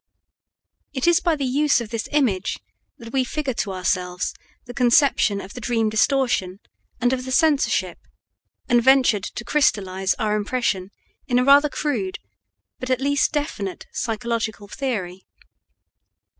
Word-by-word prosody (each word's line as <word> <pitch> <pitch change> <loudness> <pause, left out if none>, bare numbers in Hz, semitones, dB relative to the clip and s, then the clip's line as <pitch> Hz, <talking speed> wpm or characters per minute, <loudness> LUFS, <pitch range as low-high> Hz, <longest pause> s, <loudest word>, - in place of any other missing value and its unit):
It 260 -3 -2
is 345 -1 +5
by 340 -3 +1
the 280 -2 -3
use 280 +1 +2
of 235 -2 -7
this 230 -1 -4
image 225 -10 +1 0.4
that 230 +1 -11
we 265 -1 +2
figure 275 +1 -3
to 210 -3 -3
ourselves 180 -1 -2 0.3
the 245 - -9
conception 245 -4 +3
of 195 0 -9
the 250 - -8
dream 225 -2 0
distortion 215 -4 +1 0.4
and 245 +1 +2
of 255 -1 -2
the 260 - -6
censorship, 300 0 +2 0.7
and 240 0 +4
ventured 255 -5 +4
to 240 - -7
crystallize 195 -9 +1
our 210 -1 -1
impression 205 -3 -1 0.4
in 245 -3 +1
a 250 - +3
rather 285 +2 +6
crude, 235 -12 -2 0.6
but 255 - -5
at 255 -1 +1
least 285 +1 +1
definite, 285 -11 -4
psychological 225 -2 -3
theory. 200 -7 -4
240 Hz, 145 wpm, -22 LUFS, 205-275 Hz, 0.7 s, rather